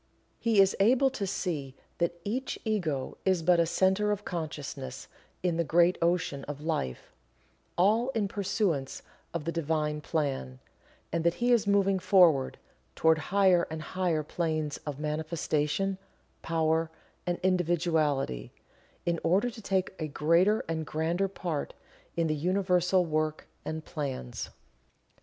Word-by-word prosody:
He 225 -3 +2
is 195 0 +5
able 255 +6 +4
to 205 -6 -3
see 150 -8 -3 0.2
that 170 0 0
each 255 +6 -2
Ego 170 -12 -1
is 185 -3 +2
but 175 0 +4
a 165 - +3
Centre 190 +4 +2
of 205 0 -3
Consciousness 145 -6 -5 0.4
in 175 -2 +1
the 170 - +2
great 170 +3 +4
Ocean 170 -5 +1
of 145 -1 -6
Life 110 - -3 0.6
all 215 +8 +3
in 210 -3 +1
pursuance 190 -8 -1 0.3
of 170 -3 -4
the 165 - -1
Divine 155 -2 -1
Plan, 135 - -2 0.5
and 170 0 0
that 170 0 +2
he 240 +1 +1
is 235 -4 +3
moving 195 -1 +3
forward 175 -7 +4 0.4
toward 160 0 +4
higher 185 +1 +3
and 160 0 -5
higher 175 -4 +1
planes 155 -2 -2
of 145 -2 -3
manifestation, 155 +4 -1 0.4
power 160 0 +1 0.4
and 175 0 0
individuality, 160 - +1 0.5
in 170 -1 0
order 195 +9 +2
to 225 - -11
take 190 -2 0
a 155 - -2
greater 170 +8 +3
and 160 -1 -2
grander 170 +5 0
part 175 -6 -4 0.4
in 165 - +2
the 155 - +1
Universal 180 +2 +2
work 155 -1 -1 0.2
and 155 0 -5
plans. 135 - -4
170 Hz, 140 wpm, -29 LUFS, 155-190 Hz, 0.6 s, is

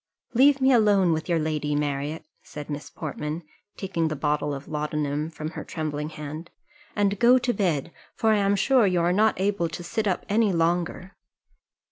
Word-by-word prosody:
"Leave 275 +3 +5
me 265 0 +4
alone 205 -6 +4
with 160 +3 -3
your 170 - +3
lady, 150 -2 -1
Marriott," 145 +2 -2 0.2
said 150 0 -9
Miss 145 0 -5
Portman, 155 +1 -5 0.3
taking 175 -4 -1
the 155 - -2
bottle 150 0 0
of 140 0 -6
laudanum 150 0 -2
from 155 -1 -6
her - - -6
trembling 150 -2 -4
hand, 155 +2 -7 0.5
"and 205 -1 +1
go 245 +2 +6
to 245 -1 0
bed; 170 - -1 0.2
for 225 -1 +2
I 215 - +4
am 200 0 +2
sure 245 +1 +4
you 180 -2 +1
are 175 +1 +2
not 215 0 +2
able 195 -3 0
to 160 +2 -7
sit 215 +5 -2
up 185 - -1
any 215 0 +2
longer." 175 +2 -1
170 Hz, 180 wpm, -25 LUFS, 150-200 Hz, 0.5 s, go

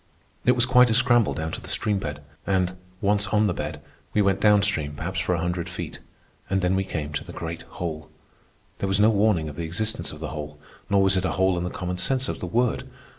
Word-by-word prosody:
It 125 - +6
was 120 0 +3
quite 125 -1 +6
a 110 - +3
scramble 120 -3 +4
down 80 0 -3
to - - -5
the - - -9
stream 105 -2 0
bed, 75 -3 -5 0.2
and, 90 -2 +1 0.3
once 100 0 +2
on 105 +1 +3
the 95 - +1
bed, 75 -1 -5 0.3
we 105 - +5
went 95 0 +2
down 105 -1 +5
stream 75 -7 0
perhaps 95 +5 -3
for 90 - +1
a - - -2
hundred 85 0 -2
feet. - - -6 0.5
And 95 0 +1
then 90 +1 +2
we 95 - +1
came 75 -5 -4
to 75 - -2
the - - -10
great 85 0 -5 0.2
hole. 80 -3 -4 0.7
There 100 - -1
was 95 +1 +2
no 110 +2 +6
warning 100 -6 +2
of 75 -1 -8
the 85 - -3
existence 110 +7 -1
of - - -10
the - - -4
hole, 75 0 -6 0.3
nor 100 -1 +4
was 95 0 +3
it 95 - 0
a - - 0
hole 95 -1 +2
in 85 - -2
the 90 - -2
common 90 0 -4
sense 130 +6 +1
of - - -4
the 90 - -4
word. 120 +6 0
95 Hz, 245 wpm, -25 LUFS, 80-105 Hz, 0.7 s, It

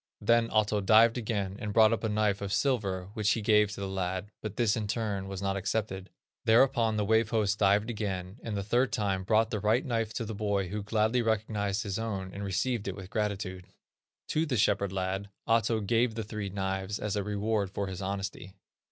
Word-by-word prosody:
Then 115 +2 +3
Ahto 105 -1 +1
dived 115 +3 +6
again, 100 -4 -2
and 105 -1 -4
brought 110 0 +6
up 115 - -2
a 110 - 0
knife 105 -1 +1
of 100 -1 -3
silver, 100 -5 0
which 105 -1 +2
he 115 - -2
gave 105 -1 +4
to 100 - -7
the 100 - -2
lad, 95 +1 -3
but 105 -2 -5
this 115 -3 +2
in 110 -3 -2
turn 100 -3 -2
was 95 0 -5
not 95 0 0
accepted. 100 -1 -2 0.3
Thereupon 115 -1 +4
the 105 - +1
Wave 110 +1 +3
host 105 -3 +1
dived 100 +1 +3
again, 100 -2 -4
and 110 -3 -4
the 100 - -2
third 120 +6 +1
time 100 -4 -1
brought 110 +3 +2
the 110 - -1
right 110 +5 +2
knife 115 -4 -1
to 115 - -2
the 110 - -5
boy 100 -3 -1
who 105 +2 -3
gladly 110 +3 +1
recognized 105 -2 -1
his 100 -1 -3
own, 95 -4 -4
and 100 - -6
received 105 +3 -1
it 95 - -3
with 95 -1 -10
gratitude. 100 -4 -3 0.6
To 160 +1 +1
the 130 -4 0
shepherd 100 -2 +2
lad 95 +1 -2 0.2
Ahto 115 -1 +2
gave 115 +2 +2
the 115 - -3
three 105 -2 -5
knives 95 +1 -2
as 105 -1 -3
a 105 - 0
reward 105 0 -1
for 100 +1 -3
his 95 -1 -6
honesty. 95 0 -4
105 Hz, 210 wpm, -29 LUFS, 95-110 Hz, 0.6 s, dived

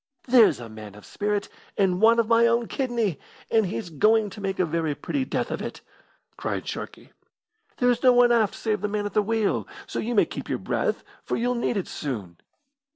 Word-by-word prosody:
"There's 240 - +6
a 120 - -8
man 110 -2 -10
of 105 - -14
spirit, 205 -1 -2 0.3
and 190 -2 +2
one 230 +1 +6
of 230 -2 +2
my 230 +1 +5
own 235 0 +1
kidney, 235 - -1 0.3
and 220 -3 +3
he's 165 +2 -5
going 215 +6 +3
to 210 - -9
make 195 -1 -2
a 185 - +2
very 160 -2 -1
pretty 270 - -2
death - - -2
of - - -3
it!" - - -6 0.6
cried - - -3
Sharkey. - - -7 0.7
"There's 245 -1 +2
no 255 - +6
one 245 0 +5
aft 225 -4 +2
save 215 -3 -2
the 210 - 0
man 205 0 -2
at 205 - -4
the 210 - +3
wheel, 220 0 0 0.2
so - - -4
you 235 +2 -2
may - - +5
keep - - -7
your - - 0
breath, - - -1 0.2
for - - -2
you'll 245 +2 0
need 240 -2 -1
it 190 - -2
soon. 105 - -5
210 Hz, 210 wpm, -25 LUFS, 180-235 Hz, 0.7 s, There's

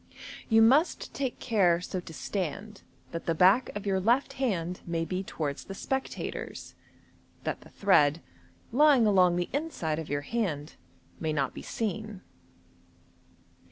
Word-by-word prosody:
You 225 -1 +6
must 280 +9 +3
take 265 -3 -2
care 190 -8 +3
so 180 +1 -4
to 175 - -10
stand 200 +5 -4 0.3
that 165 - -6
the 165 - +1
back 190 +9 +5
of 205 - -5
your 195 -1 +1
left 235 +8 +2
hand 180 -10 -2
may 165 -1 -1
be 185 +2 -2
towards 150 -6 -4
the 195 - -7
spectators, 265 +6 -4 0.7
that - - -3
the - - -15
thread, 155 -6 +3 0.5
lying 280 -2 +5
along 185 -4 +4
the 175 0 -2
inside 270 - -2
of 160 - -6
your 145 0 -1
hand, 160 -6 -2 0.5
may 160 -1 -1
not 140 -4 -1
be - - -8
seen. 215 -2 -4
190 Hz, 145 wpm, -29 LUFS, 165-225 Hz, 0.7 s, You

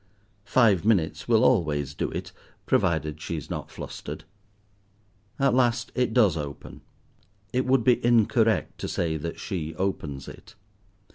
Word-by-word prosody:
Five 110 -8 +4
minutes 100 -7 +1
will 115 -2 +4
always 75 - +1
do - - -2
it, - - -6 0.3
provided 80 -2 0
she 85 - -4
is 75 - -8
not - - -5
flustered. - - -8 1.1
At 135 -2 +2
last 120 -1 +1
it 125 -2 0
does 110 -8 +4
open. 75 -3 -7 0.7
It 130 +1 0
would 130 -2 +3
be 125 +1 +3
incorrect 115 -1 +2
to - - -4
say 80 -2 -1
that 85 +2 -6
she 80 -6 -4
opens 75 -7 -3
it. - - -12
100 Hz, 140 wpm, -26 LUFS, 80-120 Hz, 1.1 s, Five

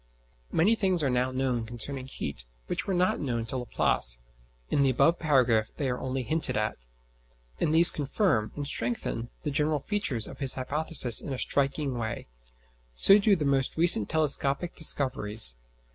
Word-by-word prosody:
] - - -37
Many 190 +8 +3
things 190 -7 +1
are 135 - +1
now 125 +1 0
known 130 -2 -2
concerning 130 +3 -3
heat 70 - -6 0.2
which - - -4
were 195 - -1
not 180 +1 +1
known 120 -5 -3
to 130 - -4
Laplace - - 0 0.5
(in 145 - +2
the 135 - +3
above 165 +7 +2
paragraph 125 -8 +2
they 135 -3 -2
are 125 - -4
only 130 0 -4
hinted 155 -2 -1
at), 105 - -4 0.7
and 155 - 0
these 165 +2 +6
confirm 145 - -1
and 145 - -5
strengthen 120 -2 -3
the 150 - -3
general 150 +1 0
features 140 - -2
of - - -11
his 135 -2 0
hypothesis 135 -2 +2
in 140 - -6
a - - -4
striking 140 -1 -1
way; 110 -1 -5 0.7
so 195 - +6
do 205 0 +3
the 155 -5 -3
most 135 0 0
recent 160 -11 +3
telescopic 155 +1 -1
discoveries. 110 - +3
135 Hz, 170 wpm, -27 LUFS, 120-155 Hz, 0.7 s, these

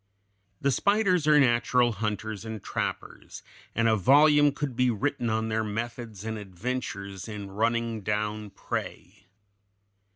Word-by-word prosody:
The 140 - +1
spiders 195 - +2
are 150 -1 +6
natural 120 -1 +3
hunters 110 0 -3
and 110 -3 -7
trappers, - - -5 0.3
and 115 +1 +2
a 110 - +4
volume 145 - +5
could 140 -3 -4
be 125 +1 +3
written 120 +2 -1
on 110 0 -1
their 110 0 0
methods 110 -1 -5
and 110 -1 -3
adventures 100 -1 -5
in 105 -3 -7
running 115 +1 0
down 105 +1 -2
prey. 100 - -6
115 Hz, 130 wpm, -27 LUFS, 105-125 Hz, 0.3 s, are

